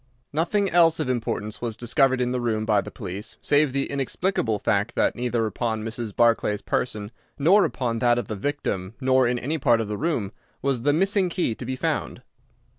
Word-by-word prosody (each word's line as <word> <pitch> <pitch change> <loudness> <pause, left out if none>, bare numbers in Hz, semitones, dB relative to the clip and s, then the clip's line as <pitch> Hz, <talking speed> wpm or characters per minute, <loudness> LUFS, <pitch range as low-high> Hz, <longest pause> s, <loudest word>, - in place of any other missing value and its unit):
Nothing 175 +6 +1
else 165 -3 +4
of 140 -5 0
importance 110 -3 -3
was 115 -2 -3
discovered 130 +2 +2
in 125 0 0
the 125 -1 -1
room 110 -2 -1
by 105 -2 +3
the - - -8
police, 100 0 -7
save 145 -1 +3
the 140 +1 0
inexplicable 140 - -1
fact 105 +3 0
that - - +2
neither 120 -2 -1
upon 110 +1 -2
Mrs. 115 0 -4
Barclay's 115 -3 +2
person 105 -3 -2 0.3
nor 185 +8 +5
upon 115 -4 -2
that 120 +1 +3
of 120 - -2
the 110 - -4
victim 100 -4 -3
nor 130 -1 +3
in 120 0 0
any 150 +6 -2
part 120 -4 +3
of 110 - -2
the 105 0 -3
room 140 - -1 0.3
was 135 -3 -1
the 145 +4 +3
missing 190 +4 +2
key 175 -9 0
to 120 - -7
be 130 - -2
found. - - -2
120 Hz, 195 wpm, -24 LUFS, 110-145 Hz, 0.3 s, nor